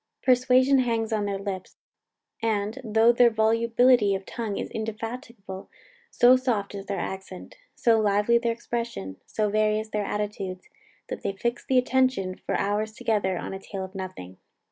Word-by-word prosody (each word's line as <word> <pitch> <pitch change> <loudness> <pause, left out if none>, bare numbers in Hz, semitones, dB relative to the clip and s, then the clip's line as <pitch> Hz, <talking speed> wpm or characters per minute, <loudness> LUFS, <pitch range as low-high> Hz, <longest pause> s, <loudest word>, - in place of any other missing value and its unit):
Persuasion 255 +1 +4
hangs 230 -3 0
on 210 -1 0
their 200 -1 -2
lips; 195 -2 -6 0.6
and, 220 +2 -1
though 225 +1 +4
their 240 0 +5
volubility 230 0 +3
of 190 0 -6
tongue 220 -4 -4
is - - -4
indefatigable, 225 -2 -6 0.4
so 245 +1 +6
soft 240 -7 -1
is 200 -1 -7
their 200 - -2
accent, 190 +1 -6 0.2
so 230 -2 +3
lively 210 +3 +3
their 235 0 0
expression, 230 - -4
so 210 -1 -1
various 215 +1 +1
their 210 -1 -1
attitudes, 200 -3 -4 0.4
that - - -5
they 195 - -2
fix 235 +5 -2
the 260 - +1
attention 255 -7 +2
for - - -3
hours 210 +2 -1
together 205 -5 0
on - - -5
a 190 - -5
tale 195 0 -6
of 190 - -13
nothing. 185 - -7
215 Hz, 160 wpm, -26 LUFS, 195-235 Hz, 0.6 s, so